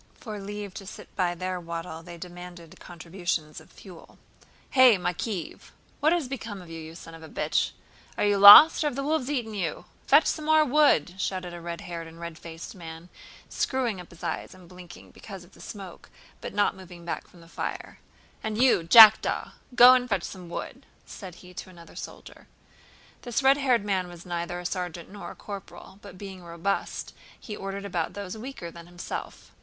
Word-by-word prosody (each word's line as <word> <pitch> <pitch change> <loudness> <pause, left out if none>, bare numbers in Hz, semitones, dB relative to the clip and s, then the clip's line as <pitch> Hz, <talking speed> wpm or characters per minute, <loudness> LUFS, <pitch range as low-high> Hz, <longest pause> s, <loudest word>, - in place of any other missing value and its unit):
For 215 -4 -7
leave 205 0 -6
to 195 -1 -9
sit - - -11
by 175 -1 0
their 185 +1 -3
wattle 165 -1 -6
they 170 0 -10
demanded 175 -1 -11
contributions 170 -2 -4
of - - -19
fuel. 180 -5 -14 0.6
"Eh, 255 -4 +7
Makéev! 180 +1 -4 0.3
What 310 +2 +3
has 340 -6 +1
become 230 -6 -6
of 175 -2 -12
you, 165 - -7
you 160 +1 -10
son 165 -1 -11
of 165 - -11
a 160 - -11
bitch? - - 0 0.4
Are - - +1
you 205 -1 +2
lost 205 +12 +11
or - - +2
have 290 - -3
the 275 - -3
wolves 295 -2 -1
eaten 240 -7 -2
you? 180 -7 -3 0.2
Fetch 290 +4 +6
some 310 - -2
more 310 0 +5
wood!" 245 - +3
shouted 185 -3 -3
a 175 - -8
red 170 0 -6
haired 170 -2 -7
and 165 +1 -13
red 170 -2 -7
faced 165 +6 -9
man, 165 -2 -10 0.4
screwing 240 -8 -1
up 175 - -14
his 170 - -16
eyes - - -4
and 185 -2 -16
blinking 180 -1 -13
because 195 -4 -10
of 175 - -19
the - - -17
smoke 195 -5 -10 0.3
but - - -7
not 205 -1 +2
moving 180 -2 -12
back 170 - -4
from 175 - -18
the 165 - -16
fire. - - -6 0.4
"And 220 0 -3
you, 255 -7 +5
Jackdaw, 215 +6 +7 0.2
go 245 +1 +10
and 250 -1 +1
fetch 195 -5 0
some 180 -3 -8
wood!" - - -7 0.2
said 185 -4 -10
he 180 - -13
to 185 - -8
another 170 -2 -15
soldier. - - -10 0.7
This 240 +2 -2
red 270 +1 +6
haired 250 -7 +2
man 190 -3 0
was 175 -1 -12
neither 175 0 -4
a 180 - -9
sergeant 175 -2 -4
nor 205 - -8
a - - -10
corporal, 195 -1 -10
but 200 -3 -12
being 190 -2 -9
robust 170 +4 -3 0.3
he 210 - -7
ordered 195 0 -6
about 175 -3 -2
those 200 -1 -6
weaker 220 -7 -7
than 170 0 -12
himself. 175 0 -7
185 Hz, 195 wpm, -27 LUFS, 170-215 Hz, 0.7 s, lost